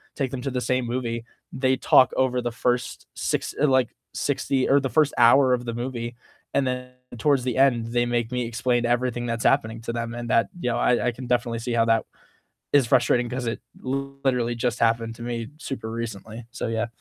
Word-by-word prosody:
take 135 Hz, -3 st, -2 dB
them 130 Hz, -, -4 dB
to 135 Hz, -, -2 dB
the 125 Hz, -, -2 dB
same 130 Hz, 0 st, 0 dB
movie, 115 Hz, -2 st, -2 dB, 0.3 s
they 130 Hz, 0 st, +1 dB
talk 130 Hz, -1 st, +5 dB
over 125 Hz, -1 st, +2 dB
the 120 Hz, -1 st, -2 dB
first 125 Hz, +1 st, -1 dB
six -, -, -2 dB
uh, 150 Hz, -, +5 dB
like 130 Hz, -3 st, +3 dB, 0.3 s
60, 130 Hz, -2 st, 0 dB
or 140 Hz, +1 st, +6 dB
the 135 Hz, -1 st, -2 dB
first 155 Hz, -2 st, +3 dB
hour 125 Hz, +2 st, +6 dB
of 120 Hz, 0 st, -1 dB
the 115 Hz, -, -3 dB
movie, 120 Hz, -1 st, -4 dB, 0.4 s
and 140 Hz, -1 st, +3 dB
then 125 Hz, 0 st, -3 dB, 0.3 s
towards 135 Hz, +1 st, +2 dB
the 125 Hz, -1 st, -2 dB
end, 120 Hz, -4 st, +3 dB
they 120 Hz, 0 st, +2 dB
make 120 Hz, 0 st, -1 dB
me 125 Hz, -1 st, -1 dB
explain 120 Hz, +1 st, 0 dB
everything 120 Hz, 0 st, 0 dB
that's 115 Hz, 0 st, -2 dB
happening 115 Hz, -5 st, +2 dB
to 115 Hz, -, -4 dB
them 115 Hz, 0 st, -3 dB
and 120 Hz, -1 st, -5 dB
that 115 Hz, -, +4 dB
you 125 Hz, -, -1 dB
know, -, -, -1 dB
I 125 Hz, 0 st, +2 dB
I -, -, +2 dB
can 125 Hz, +2 st, -9 dB
definitely 120 Hz, -1 st, 0 dB
see 120 Hz, +1 st, -3 dB
how 115 Hz, -1 st, +3 dB
that 115 Hz, -1 st, +2 dB, 0.7 s
is 140 Hz, -4 st, +5 dB
frustrating 125 Hz, -1 st, +3 dB
'cause 125 Hz, 0 st, -4 dB
it 115 Hz, -, -2 dB, 0.2 s
literally 135 Hz, -2 st, -1 dB
just 120 Hz, 0 st, -1 dB
happened 115 Hz, 0 st, +1 dB
to 115 Hz, -, -10 dB
me 115 Hz, -1 st, -4 dB
super 130 Hz, -7 st, -5 dB
recently, 115 Hz, 0 st, -6 dB
so 130 Hz, -, -4 dB
yeah. 115 Hz, 0 st, -1 dB
120 Hz, 210 wpm, -24 LUFS, 115-130 Hz, 0.7 s, or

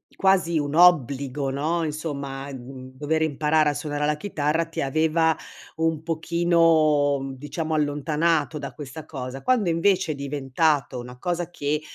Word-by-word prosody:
quasi 185 Hz, -4 st, +2 dB
un 145 Hz, 0 st, -2 dB
obbligo, 140 Hz, -5 st, +3 dB
no, 155 Hz, +5 st, -1 dB
insomma, 140 Hz, -3 st, -4 dB
mhmm, 130 Hz, 0 st, -9 dB
dover 155 Hz, +3 st, 0 dB
imparare 155 Hz, 0 st, +2 dB
a 145 Hz, -, 0 dB
suonare 145 Hz, 0 st, -2 dB
la 150 Hz, 0 st, +1 dB
chitarra 160 Hz, -2 st, -1 dB
ti 165 Hz, -, -4 dB
aveva 160 Hz, +3 st, +2 dB, 0.4 s
un 160 Hz, -1 st, 0 dB
pochino, 160 Hz, -3 st, +3 dB
mhmm, 135 Hz, 0 st, -5 dB
diciamo 160 Hz, +3 st, -4 dB
allontanato 150 Hz, +1 st, 0 dB
da 140 Hz, -2 st, -6 dB
questa 145 Hz, +1 st, -8 dB
cosa. 130 Hz, -2 st, -6 dB
Quando 235 Hz, -8 st, +2 dB
invece, 180 Hz, +1 st, +2 dB
è -, -, -3 dB
diventato 140 Hz, 0 st, 0 dB
una 125 Hz, +1 st, -9 dB
cosa 175 Hz, +5 st, -2 dB
che 150 Hz, -2 st, -2 dB
150 Hz, 145 wpm, -24 LUFS, 140-165 Hz, 0.4 s, obbligo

